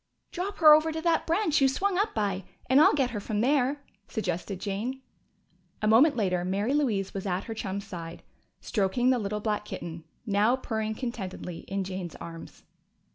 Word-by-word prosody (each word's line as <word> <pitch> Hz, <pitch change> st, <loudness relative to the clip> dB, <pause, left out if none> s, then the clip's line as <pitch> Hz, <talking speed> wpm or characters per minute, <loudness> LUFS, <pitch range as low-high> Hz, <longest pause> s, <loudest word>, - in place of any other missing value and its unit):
"Drop 395 Hz, +2 st, -4 dB
her 310 Hz, -3 st, +9 dB
over 310 Hz, +1 st, +4 dB
to 320 Hz, -, -3 dB
that 330 Hz, 0 st, +1 dB
branch 330 Hz, -3 st, +2 dB
you 270 Hz, -, +6 dB
swung 375 Hz, +9 st, 0 dB
up 420 Hz, +2 st, 0 dB
by, 200 Hz, -3 st, -1 dB, 0.2 s
and 265 Hz, +3 st, +6 dB
I'll -, -, +6 dB
get 265 Hz, -4 st, +1 dB
her 215 Hz, -, -3 dB
from 210 Hz, +1 st, -2 dB
there," 280 Hz, +2 st, +1 dB, 0.2 s
suggested 185 Hz, -2 st, -3 dB
Jane. 225 Hz, +7 st, -3 dB, 0.8 s
A 215 Hz, -, 0 dB
moment 255 Hz, +8 st, +6 dB
later 185 Hz, -6 st, 0 dB
Mary 200 Hz, +7 st, 0 dB
Louise 225 Hz, -10 st, 0 dB
was 195 Hz, 0 st, -4 dB
at 180 Hz, 0 st, -1 dB
her 225 Hz, -, -5 dB
chum's 200 Hz, -2 st, -4 dB
side, 170 Hz, -4 st, -8 dB, 0.4 s
stroking 240 Hz, +5 st, +1 dB
the 255 Hz, -, +2 dB
little 210 Hz, 0 st, -3 dB
black 210 Hz, -1 st, -1 dB
kitten, 170 Hz, -5 st, -7 dB, 0.2 s
now 210 Hz, +3 st, +3 dB
purring 220 Hz, -4 st, -3 dB
contentedly 195 Hz, -8 st, -5 dB
in 195 Hz, 0 st, -2 dB
Jane's 185 Hz, -3 st, -5 dB
arms. 165 Hz, -1 st, -10 dB
215 Hz, 180 wpm, -28 LUFS, 195-270 Hz, 0.8 s, her